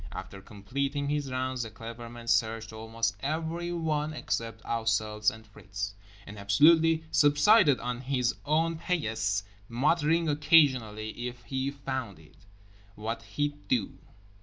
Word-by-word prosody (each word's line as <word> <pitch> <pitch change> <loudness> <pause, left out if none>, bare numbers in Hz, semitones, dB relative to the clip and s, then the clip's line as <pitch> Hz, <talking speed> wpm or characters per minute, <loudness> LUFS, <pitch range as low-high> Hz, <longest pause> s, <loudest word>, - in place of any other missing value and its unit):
After 95 +1 -8
completing 140 +9 -3
his 145 -2 -1
rounds 130 0 -2
The 115 - -4
Clever 115 +2 -9
Man 120 0 -10
searched 110 0 0
almost 115 -1 -2
everyone 160 +1 -2
except 115 -6 -4
ourselves 110 -2 +1
and 110 0 -11
Fritz, 100 -1 -6 0.3
and 100 0 -9
absolutely 160 +11 +5
subsided 145 - +5
on 125 0 -4
his 125 -2 0
own 160 +2 +1
paillasse 110 - -1 0.3
muttering 155 +6 +2
occasionally 130 -8 +2
"if 120 -1 -9
he 130 +2 -2
found 130 - -5
it" 80 +5 -20 0.5
what 115 +2 -4 0.2
he'd 145 0 -2
do. 120 -6 -1
125 Hz, 125 wpm, -29 LUFS, 110-150 Hz, 0.5 s, absolutely